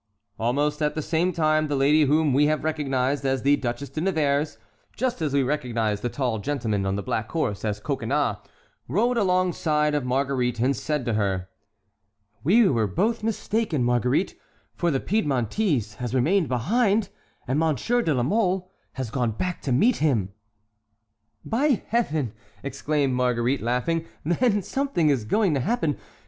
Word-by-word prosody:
Almost 145 +6 0
at 150 0 0
the 155 - -1
same 170 +4 +1
time 155 -2 +2
the 145 - -1
lady 145 +3 +4
whom 150 0 +2
we 145 +3 +4
have 155 0 0
recognized 140 -3 0
as 135 -1 0
the 140 +1 +5
Duchesse 130 0 -4
de 155 - -3
Nevers, 155 -5 0 0.4
just 245 -6 -2
as 155 -3 0
we 140 0 +2
recognized 120 -7 -1
the 120 - -1
tall 120 -2 -1
gentleman 110 -6 -1
on 95 - 0
the 100 - -3
black 110 +3 -2
horse 105 -12 -1
as 105 -1 -2
Coconnas, - - -1 0.5
rode 230 - +1
alongside 180 -7 +1
of 145 -2 0
Marguerite 125 -2 0
and 130 +4 +2
said 150 +3 -2
to 120 - 0
her: 95 -3 -1 0.9
"We 205 - +5
were 115 - +1
both 215 - 0
mistaken, 215 - -1
Marguerite, 125 - +1 0.4
for 175 - 0
the 135 -4 +1
Piedmontese 140 - 0
has 125 0 -3
remained 160 +5 +2
behind 200 - +1 0.4
and 130 +4 +1
Monsieur 165 - +1
de 165 - 0
la 125 - +1
Mole 185 - 0 0.2
has 130 -4 -5
gone 120 -4 0
back 180 - -3
to 135 - -3
meet 215 - +3
him." 115 -11 0 1.1
"By 265 +1 +1
Heaven!" 155 - 0 0.3
exclaimed 140 0 -1
Marguerite, 125 +1 +1
laughing, 140 +8 -1 0.2
"then 205 +4 +2
something 265 - +1
is 125 -6 0
going 195 - +2
to 140 - +1
happen. 160 - 0
145 Hz, 160 wpm, -25 LUFS, 125-175 Hz, 1.1 s, the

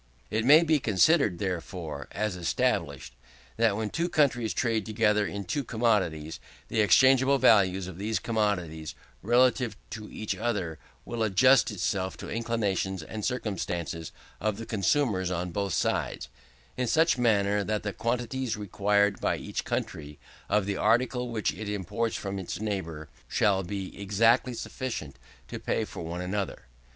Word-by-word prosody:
It 110 +1 0
may 150 +5 +8
be 160 -2 +3
considered, 110 - +3
therefore, 85 -6 -4
as 105 -2 -2
established, 85 -6 -1 0.4
that 110 -3 +3
when 110 -1 -2
two 170 +1 -1
countries 125 -8 +2
trade 115 -3 0
together 105 -1 +1
in 100 0 -5
two 145 +6 -2
commodities, 95 -10 0 0.3
the 110 - +2
exchangeable 130 +5 +5
value 100 -8 +5
of 95 -1 -9
these 110 +2 -1
commodities 90 -9 -2 0.3
relatively 125 +2 +2
to 105 -1 -7
each 105 -2 -3
other 95 -7 -2 0.3
will 120 -1 -4
adjust 110 +7 +5
itself 95 -2 -2
to - - -8
the - - -5
inclinations 100 -6 -1
and 105 +7 -7
circumstances 90 - -3 0.3
of 105 0 -1
the 115 - -6
consumers 105 -3 +1
on 90 0 -2
both 100 0 -2
sides, - - -1 0.5
in 125 -1 -1
such 160 +1 +3
manner 105 -3 +2
that 105 +1 -2
the 105 -1 -3
quantities 120 +1 -2
required 100 0 +1
by - - +1
each - - -4
country, 75 -1 -4 0.3
of 105 -1 +2
the 100 0 -2
article 125 +3 +1
which 110 -9 -1
it 105 +5 -6
imports 105 +3 -2
from 100 -1 -4
its 90 -1 -5
neighbour, 90 -8 -4 0.2
shall 95 -2 +2
be 95 +1 -5
exactly 115 +5 +3
sufficient 115 - -5 0.3
to - - -6
pay - - -1
for - - -8
one 85 +2 -4
another. 95 +2 -3
105 Hz, 150 wpm, -28 LUFS, 95-115 Hz, 0.5 s, may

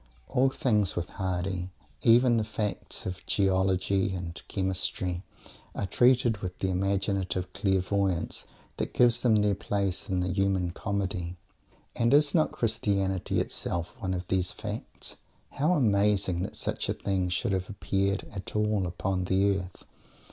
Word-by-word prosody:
All 135 0 +3
things 105 -7 +1
with 85 -1 -2
Mr. - - -17
Hardy 95 -1 -2 0.3
even 120 +1 +5
the 110 - +2
facts 105 -1 -3
of 90 0 -5
geology 95 0 +2
and 85 -2 -6
chemistry 95 -2 -1 0.5
are - - -1
treated 120 +1 +3
with 90 -2 -5
that 95 - -1
imaginative 95 -1 -1
clairvoyance 95 -2 0 0.3
that - - -3
gives 120 -1 +4
them 115 -3 +4
their 105 -1 +3
place 100 0 -2
in 95 -1 +1
the 90 0 -1
human 95 -2 +1
comedy. 95 -3 -3 0.6
And 120 +2 +4
is 145 0 +4
not 160 -3 +3
Christianity 100 -5 0
itself 85 0 -3
one 95 -1 -1
of 90 0 -5
these 95 -1 +1
facts? - - -5 0.3
How 155 +6 +2
amazing 100 - +2
that 95 - -4
such - - -2
a - - +2
thing 95 -2 -1
should 90 +2 -1
have 95 -1 -1
appeared 100 -1 -1
at 95 +1 -7
all 105 -3 +1
upon 90 +1 -2
the 95 +2 +3
earth! 90 -2 -10
95 Hz, 150 wpm, -28 LUFS, 90-105 Hz, 0.6 s, even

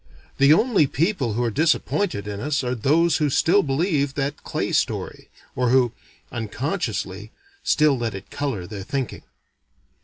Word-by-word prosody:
The 140 +1 +6
only 200 - +4
people 145 - 0
who 120 +3 0
are 115 - 0
disappointed 160 - 0
in 100 -1 -5
us 145 +3 -1
are 125 0 -1
those 155 +8 +2
who 150 -1 +1
still 175 +8 +4
believe 145 -2 0
that 145 +1 -3
clay - - -2
story. - - -2 0.3
Or 125 -1 +1
who 125 -2 +4 0.4
unconsciously 110 - -3 0.3
still 150 -3 +3
let 115 -4 -2
it 95 - -10
color 135 -11 -3
their 100 +1 -7
thinking. 130 +5 -4
135 Hz, 150 wpm, -23 LUFS, 115-155 Hz, 0.4 s, The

